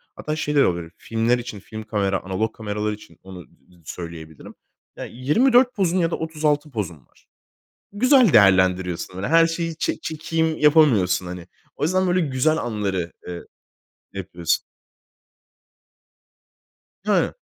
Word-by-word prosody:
hatta 155 Hz, 0 st, -4 dB
şey 150 Hz, -1 st, -2 dB
de 140 Hz, -, +5 dB
olabilir. 85 Hz, -2 st, -2 dB
Filmler 115 Hz, +2 st, 0 dB
için 115 Hz, -4 st, -7 dB
film 110 Hz, +2 st, -9 dB
kamera, 100 Hz, -3 st, -1 dB
analog 95 Hz, +4 st, -2 dB
kameralar 105 Hz, 0 st, -3 dB
için 105 Hz, +1 st, -13 dB
onu 95 Hz, -3 st, -11 dB, 0.4 s
söyleyebilirim. 80 Hz, -3 st, -9 dB, 0.4 s
Ya, -, -, -6 dB
24 245 Hz, -, +3 dB
pozun 185 Hz, -2 st, +1 dB
ya 170 Hz, -1 st, +1 dB
da -, -, 0 dB
36 150 Hz, -2 st, -1 dB
pozun 100 Hz, -8 st, -4 dB
var. -, -, -30 dB, 0.6 s
Güzel 250 Hz, -, +4 dB
değerlendiriyorsun, 95 Hz, -3 st, +3 dB
hani, 95 Hz, +4 st, -4 dB
her 165 Hz, +2 st, +5 dB
şeyi 165 Hz, -1 st, -3 dB
ç -, -, -2 dB
çekeyim 160 Hz, 0 st, -2 dB
yapamıyorsun, 140 Hz, -, +4 dB
hani. 90 Hz, 0 st, -8 dB, 0.3 s
O -, -, -5 dB
yüzden 185 Hz, +3 st, +1 dB
böyle 180 Hz, +1 st, +2 dB
güzel 150 Hz, +2 st, +1 dB
anları, 100 Hz, -, -2 dB, 0.2 s
eee, 90 Hz, -1 st, -6 dB, 0.7 s
yapıyorsun. 90 Hz, -3 st, -2 dB, 2.4 s
Ha. -, -, +1 dB
115 Hz, 130 wpm, -22 LUFS, -, 2.4 s, de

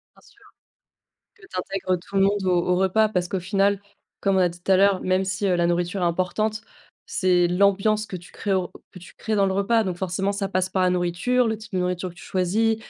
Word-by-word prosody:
Bien -, -, -21 dB
sûr. -, -, -23 dB, 0.9 s
Que 440 Hz, -, -26 dB
tu 280 Hz, -, -6 dB
intègres 185 Hz, 0 st, -2 dB
tout 195 Hz, +3 st, -9 dB
le 195 Hz, -, +4 dB
monde 200 Hz, 0 st, +1 dB
au 180 Hz, -2 st, +1 dB
au 180 Hz, -, +3 dB
repas 190 Hz, +4 st, +3 dB
parce 180 Hz, -4 st, -1 dB
qu'au 190 Hz, -, -2 dB
final, 195 Hz, +2 st, +1 dB, 0.4 s
comme 195 Hz, -1 st, +1 dB
on -, -, +3 dB
a 180 Hz, -1 st, +4 dB
dit 175 Hz, +1 st, -11 dB
tout 195 Hz, -, -3 dB
à -, -, +6 dB
l'heure, 195 Hz, 0 st, +3 dB
même 185 Hz, +1 st, +1 dB
si, 190 Hz, +2 st, -2 dB
heu, 185 Hz, -2 st, +2 dB
la 175 Hz, 0 st, +2 dB
nourriture 175 Hz, +2 st, -1 dB
est -, -, +2 dB
importante, 185 Hz, +5 st, -1 dB, 0.5 s
c'est 180 Hz, -2 st, +2 dB
l'ambiance 200 Hz, +3 st, +2 dB
que -, -, -9 dB
tu 175 Hz, 0 st, -13 dB
crées 200 Hz, -, -3 dB
au 185 Hz, -2 st, 0 dB, 0.2 s
que -, -, -11 dB
tu 175 Hz, -, -14 dB
crées 220 Hz, -, -3 dB
dans 200 Hz, -2 st, +3 dB
le 190 Hz, -, 0 dB
repas. 200 Hz, +4 st, +2 dB
Donc 185 Hz, -3 st, -3 dB
forcément, 190 Hz, +2 st, -1 dB
ça 200 Hz, -1 st, -3 dB
passe 185 Hz, -1 st, 0 dB
par 190 Hz, 0 st, 0 dB
la 180 Hz, -, +3 dB
nourriture, 180 Hz, +8 st, +1 dB
le 220 Hz, -, -1 dB
type 220 Hz, +1 st, -13 dB
de -, -, +1 dB
nourriture 180 Hz, 0 st, -2 dB
que -, -, -16 dB
tu 175 Hz, -, -14 dB
choisis, 210 Hz, +5 st, +1 dB
190 Hz, 250 wpm, -23 LUFS, 180-200 Hz, 0.9 s, à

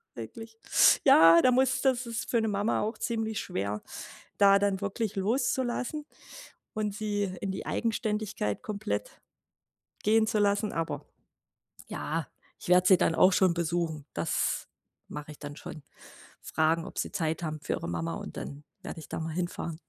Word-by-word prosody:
wirklich, 225 Hz, -1 st, -9 dB, 0.5 s
ja, 170 Hz, -10 st, +8 dB
da 255 Hz, -, +5 dB
muss 260 Hz, +1 st, +2 dB
das 260 Hz, -2 st, +2 dB
ist 230 Hz, -1 st, -4 dB
für 235 Hz, -, +2 dB
'ne 220 Hz, -, 0 dB
Mama 205 Hz, +2 st, 0 dB
auch 215 Hz, +2 st, -2 dB
ziemlich 220 Hz, -2 st, -2 dB
schwer, 100 Hz, +2 st, -3 dB, 0.6 s
da 200 Hz, -1 st, +7 dB
dann 200 Hz, -1 st, 0 dB
wirklich 205 Hz, +1 st, -2 dB
loszulassen 250 Hz, +6 st, -1 dB, 0.7 s
und 210 Hz, -2 st, -2 dB
sie 205 Hz, -1 st, -1 dB, 0.2 s
in 195 Hz, -, -1 dB
die 190 Hz, -, -6 dB
Eigenständigkeit 210 Hz, -, -2 dB
komplett 215 Hz, -, -4 dB, 0.8 s
gehen 220 Hz, +1 st, +4 dB
zu 215 Hz, -, +1 dB
lassen. 205 Hz, +1 st, +1 dB
Aber 150 Hz, -3 st, -3 dB, 0.8 s
ja, -, -, -3 dB, 0.3 s
ich -, -, -10 dB
werde 180 Hz, +1 st, +5 dB
sie 190 Hz, -, +8 dB
dann 165 Hz, -, +2 dB
auch 185 Hz, -, +6 dB
schon 185 Hz, -1 st, +4 dB
besuchen. 165 Hz, -3 st, -2 dB
Das -, -, -1 dB, 0.4 s
mache 150 Hz, +1 st, -7 dB
ich 150 Hz, -, -15 dB
dann 145 Hz, -1 st, -7 dB
schon. 155 Hz, -, -9 dB, 0.6 s
Fragen, 160 Hz, +1 st, +1 dB
ob -, -, -9 dB
sie -, -, -3 dB
Zeit 165 Hz, -4 st, -1 dB
haben 155 Hz, -2 st, -3 dB
für -, -, -4 dB
ihre -, -, -4 dB
Mama 85 Hz, -1 st, -2 dB
und -, -, -8 dB
dann 140 Hz, +1 st, -7 dB, 0.2 s
werde -, -, -7 dB
ich -, -, -12 dB
da -, -, -4 dB
mal 160 Hz, 0 st, -4 dB
hinfahren. 175 Hz, -2 st, -4 dB
200 Hz, 165 wpm, -29 LUFS, 160-220 Hz, 0.8 s, ja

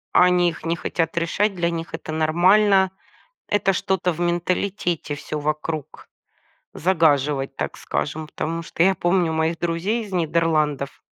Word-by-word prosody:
Они 180 Hz, -1 st, +5 dB
их 165 Hz, -, -9 dB
не 165 Hz, +1 st, 0 dB
хотят 165 Hz, 0 st, -2 dB
решать, 195 Hz, +5 st, +1 dB
для 170 Hz, -1 st, 0 dB
них 165 Hz, 0 st, -5 dB
это -, -, -7 dB
нормально. 185 Hz, +5 st, +4 dB, 0.6 s
Это 195 Hz, -1 st, +2 dB
что-то 185 Hz, 0 st, 0 dB
в 165 Hz, -, -8 dB
менталитете 175 Hz, -1 st, -1 dB
всё 145 Hz, +1 st, -5 dB
вокруг 155 Hz, 0 st, -2 dB, 0.9 s
загаживать, 150 Hz, -5 st, +1 dB
так -, -, -4 dB
скажем. 155 Hz, +1 st, -3 dB
Потому 165 Hz, +2 st, -4 dB
что 165 Hz, -, -4 dB
я 190 Hz, +1 st, +4 dB
помню 175 Hz, -1 st, +1 dB
моих 160 Hz, +1 st, 0 dB
друзей 175 Hz, +7 st, -1 dB
из 205 Hz, -, -10 dB
Нидерландов. 155 Hz, -5 st, 0 dB
170 Hz, 140 wpm, -22 LUFS, 155-185 Hz, 0.9 s, Они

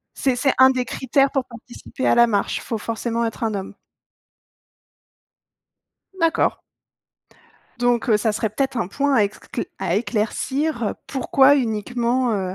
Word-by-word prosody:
C'est 260 Hz, -3 st, 0 dB
c'est 270 Hz, +2 st, +2 dB
un 260 Hz, -, +8 dB
des 255 Hz, -1 st, -1 dB
critères 270 Hz, +3 st, +1 dB
pour 270 Hz, -3 st, -1 dB
participer 240 Hz, +2 st, -7 dB
à -, -, +4 dB
la 235 Hz, 0 st, +6 dB
marche, 205 Hz, -4 st, 0 dB
il -, -, -10 dB
faut 230 Hz, -, -3 dB
forcément 230 Hz, +1 st, -2 dB
être 225 Hz, 0 st, -3 dB
un 220 Hz, -2 st, -1 dB
homme? 195 Hz, -1 st, -5 dB, 2.5 s
D'accord. 330 Hz, 0 st, +1 dB, 1.2 s
Donc, 245 Hz, 0 st, +1 dB
heu, 215 Hz, -, +5 dB
ça 215 Hz, +1 st, 0 dB
serait 215 Hz, 0 st, -2 dB
peut-être 270 Hz, +4 st, -2 dB
un 225 Hz, -, 0 dB
point 280 Hz, +7 st, 0 dB
à 215 Hz, -5 st, +4 dB
écll 200 Hz, -, -5 dB
à 170 Hz, -, -1 dB
éclaircir 240 Hz, +6 st, -1 dB
heu, -, -, -6 dB
pourquoi 270 Hz, +1 st, +4 dB
uniquement, 240 Hz, +1 st, 0 dB
heu, 185 Hz, -2 st, -3 dB
240 Hz, 155 wpm, -21 LUFS, 220-265 Hz, 2.5 s, un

